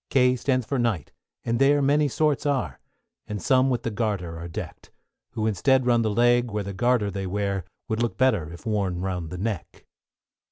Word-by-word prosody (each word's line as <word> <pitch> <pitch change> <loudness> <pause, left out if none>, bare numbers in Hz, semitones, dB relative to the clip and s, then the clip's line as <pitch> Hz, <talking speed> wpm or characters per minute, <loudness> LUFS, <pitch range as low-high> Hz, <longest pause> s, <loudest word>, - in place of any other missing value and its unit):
=K= 125 -1 +4
stands 130 0 0
for 135 +3 -1
Knight, 115 -7 -1 0.3
and 115 0 0
there 145 +1 +5
many 145 +2 +3
sorts 150 +1 0
are, 140 -2 -1 0.5
And 105 -1 -4
some 130 +7 +3
with 125 -2 -1
the 115 - -2
garter 100 -7 -2
are 85 - -6
deck'd; 80 - -8 0.4
Who 110 - -2
instead 125 +6 +2
round 120 -2 +3
the 110 - +1
leg, 120 +2 +3
where 105 -1 -2
the 100 0 -5
garter 120 0 +1
they 95 0 -4
wear, 100 -1 -2 0.2
Would 110 +1 -1
look 120 - -1
better 110 - +2
if 85 - -11
worn 100 -5 -1
round 90 -3 -3
the 90 - -6
neck. 100 -2 -5
115 Hz, 195 wpm, -25 LUFS, 95-125 Hz, 0.5 s, there